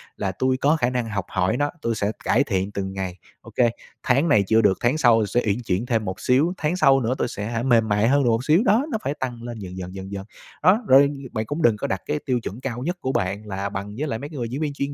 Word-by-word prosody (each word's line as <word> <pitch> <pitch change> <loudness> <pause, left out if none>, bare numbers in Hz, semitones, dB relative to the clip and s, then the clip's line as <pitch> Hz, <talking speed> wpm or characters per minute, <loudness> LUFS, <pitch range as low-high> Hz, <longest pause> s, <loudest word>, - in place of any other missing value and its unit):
là 95 - -2
tui 130 +7 0
có 145 +4 +3
khả 125 -6 +1
năng 125 -2 -1
học 100 -3 -3
hỏi 95 +6 0
nó, 145 0 0
tui 115 -1 -1
sẽ 100 +1 -1
cải 130 +5 +3
thiện 100 -5 -2
từng 95 -1 -4
ngày. 95 -1 -4 0.2
Ô - - -13
kê, 120 -1 +4 0.3
tháng 135 +6 +2
này 100 -2 +5
chưa 110 +2 +4
được, 100 -3 +3
tháng 120 +6 +2
sau 115 -7 +4
sẽ 120 +5 0
uyển 105 +4 0
chuyển 100 +1 -1
thêm 115 -4 0
một 95 0 -4
xíu, 145 +8 +2
tháng 155 +3 -1
sau 135 -7 +5
nữa 115 +2 0
tui - - 0
sẽ 105 -2 -5
hả 115 +1 -2
mềm 115 -4 +3
mại 105 +2 +2
hơn 140 +1 +3
được 120 - +2
một 115 +3 0
xíu, 160 +7 +4
đó, 225 +7 +3
nó 220 - 0
phải 140 - -1
tăng 120 -3 -4
lên 120 -2 -6
dần 95 -1 -8
dần, 90 +1 -7
dần 95 +1 -7
dần. 100 -1 -5 0.4
Đó, 195 +8 +5
rồi, 140 +2 +7 0.2
bạn 110 -1 -2
cũng 145 +7 -4
đừng 115 -5 +4
có - - -3
đặt 95 - -2
cái 150 0 -1
tiêu 125 -3 +1
chuẩn 115 +3 -7
cao 125 -2 -4
nhất 175 +4 -2
của 130 - -1
bạn 100 +1 -2
là 100 0 -3
bằng 100 +1 -6
với 150 +3 -2
lại 115 -4 -3
mấy 145 +2 -7
cái 150 - -9
người 120 -2 -3
diễn 135 +5 -4
viên 145 -2 -1
chuyên 140 0 -3
120 Hz, 295 wpm, -23 LUFS, 100-135 Hz, 0.4 s, rồi